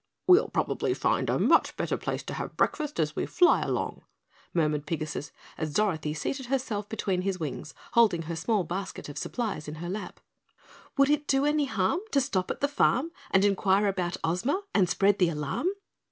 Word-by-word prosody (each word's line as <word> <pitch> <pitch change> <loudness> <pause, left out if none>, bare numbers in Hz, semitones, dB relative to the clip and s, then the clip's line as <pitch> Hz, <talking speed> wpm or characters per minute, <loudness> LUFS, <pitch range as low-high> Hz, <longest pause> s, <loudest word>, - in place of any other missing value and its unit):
"We'll 370 +4 +6
probably - - 0
find - - +1
a - - +2
much - - +3
better - - -1
place - - -3
to - - -6
have - - -5
breakfast 300 - 0
as 155 0 0
we - - -1
fly 355 -1 +4
along," - - -2 0.5
murmured 150 -3 0
Pigasus 155 -2 -3 0.3
as 155 -2 -3
Dorothy 160 -8 0
seated 265 - -3
herself 230 -6 -2
between 195 -4 -1
his 190 -1 -2
wings, 150 -5 -5 0.2
holding 210 -8 +4
her 165 +1 -4
small 195 +4 +1
basket 185 -1 -5
of 145 - -8
supplies 210 -11 -3
in 150 - -5
her 170 +2 -6
lap. 200 +2 -5 0.8
"Would 275 +1 +5
it 295 0 +1
do 270 0 +3
any 295 0 +2
harm 220 - 0
to 280 - +5
stop 200 -9 -1
at - - -4
the 285 - +3
farm 290 +1 +2 0.2
And 190 +1 +4
enquire 200 0 +3
about 185 -2 -1
Ozma 230 - 0
and 185 -4 +3
spread 200 +1 +3
the 180 -3 +4
alarm?" 150 - -2
195 Hz, 185 wpm, -28 LUFS, 165-265 Hz, 0.8 s, We'll